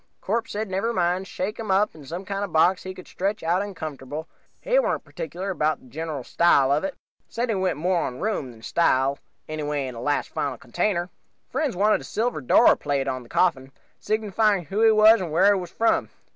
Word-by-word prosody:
"Corpse 225 Hz, +3 st, -2 dB
said 215 Hz, +1 st, -2 dB
never 195 Hz, +5 st, -1 dB
mind, 180 Hz, 0 st, 0 dB
shake 200 Hz, +5 st, -4 dB
him 220 Hz, -2 st, -5 dB
up 200 Hz, +2 st, +3 dB
some 175 Hz, +7 st, -6 dB
kind 200 Hz, +1 st, -3 dB
of 200 Hz, -, -3 dB
a -, -, -17 dB
box 175 Hz, +4 st, +4 dB
he 185 Hz, 0 st, -7 dB
could 185 Hz, -, -12 dB
stretch 200 Hz, +1 st, -2 dB
out 175 Hz, +3 st, +1 dB
in 205 Hz, -1 st, -5 dB
comfortable, 150 Hz, 0 st, -6 dB, 0.3 s
he -, -, +2 dB
warn't -, -, 0 dB
particular 195 Hz, -, -5 dB
'bout 155 Hz, -2 st, 0 dB
the -, -, -20 dB
general 150 Hz, +1 st, -5 dB
style 140 Hz, -2 st, +3 dB
of 145 Hz, +4 st, +2 dB
it. 195 Hz, -, -3 dB, 0.3 s
Said 235 Hz, +1 st, -2 dB
he -, -, +2 dB
went 185 Hz, -3 st, 0 dB
more 175 Hz, +3 st, +1 dB
on 125 Hz, -, -4 dB
room 200 Hz, -11 st, -2 dB
than 115 Hz, -2 st, -14 dB
style, 135 Hz, -3 st, +2 dB, 0.3 s
anyway 150 Hz, -2 st, -2 dB
in 130 Hz, -, -6 dB
a 115 Hz, -, -8 dB
last 145 Hz, +3 st, 0 dB
final 135 Hz, -3 st, -3 dB
container. 175 Hz, -, -1 dB, 0.4 s
"Friends 300 Hz, -9 st, -1 dB
wanted 210 Hz, +3 st, +3 dB
a -, -, -10 dB
silver 240 Hz, +3 st, -2 dB
door 125 Hz, -, +5 dB
plate 140 Hz, -1 st, -2 dB
on 130 Hz, -1 st, -2 dB
the 120 Hz, -, -16 dB
coffin, 130 Hz, 0 st, +1 dB, 0.3 s
signifying 215 Hz, -3 st, +1 dB
who 195 Hz, +8 st, -2 dB
he 225 Hz, -, +7 dB
was 215 Hz, 0 st, +6 dB
and 170 Hz, -4 st, -4 dB
wher' 190 Hz, +6 st, +5 dB
he 195 Hz, -, 0 dB
was 175 Hz, -, -7 dB
from. 230 Hz, +5 st, +1 dB
180 Hz, 215 wpm, -24 LUFS, 145-205 Hz, 0.4 s, he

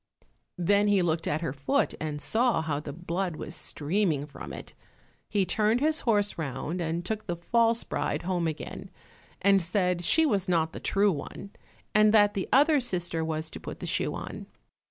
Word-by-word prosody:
Then 200 Hz, +4 st, +3 dB
he 200 Hz, -3 st, +3 dB
looked 165 Hz, -1 st, 0 dB
at 155 Hz, +2 st, 0 dB
her 150 Hz, -6 st, -2 dB
foot 145 Hz, -, 0 dB
and 150 Hz, -1 st, -3 dB
saw 230 Hz, +1 st, +1 dB
how 150 Hz, -3 st, -1 dB
the 150 Hz, -1 st, -7 dB
blood 175 Hz, +2 st, -3 dB
was 155 Hz, -, -6 dB
streaming 155 Hz, 0 st, 0 dB
from 150 Hz, -, -9 dB
it. -, -, -9 dB, 0.6 s
He 200 Hz, -2 st, +1 dB
turned 215 Hz, +5 st, +2 dB
his 310 Hz, +2 st, +2 dB
horse 205 Hz, -5 st, +1 dB
round 160 Hz, +4 st, -3 dB
and 170 Hz, +1 st, -2 dB
took 215 Hz, +2 st, -4 dB
the 175 Hz, -, -1 dB
false 230 Hz, +6 st, +2 dB
bride -, -, -2 dB
home 175 Hz, -2 st, 0 dB
again, 155 Hz, -, -6 dB, 0.5 s
and 195 Hz, 0 st, +5 dB
said 180 Hz, 0 st, 0 dB
she 320 Hz, -, +4 dB
was 200 Hz, -10 st, 0 dB
not 165 Hz, -2 st, +1 dB
the -, -, -6 dB
true 200 Hz, +1 st, +2 dB
one, 180 Hz, +5 st, -7 dB, 0.4 s
and 215 Hz, +1 st, +5 dB
that 205 Hz, -1 st, +5 dB
the 195 Hz, -, -3 dB
other 295 Hz, +2 st, +5 dB
sister 175 Hz, -7 st, -2 dB
was 160 Hz, 0 st, -2 dB
to -, -, -8 dB
put -, -, -8 dB
the -, -, -6 dB
shoe -, -, -1 dB
on. -, -, -7 dB
180 Hz, 185 wpm, -28 LUFS, 160-210 Hz, 0.6 s, and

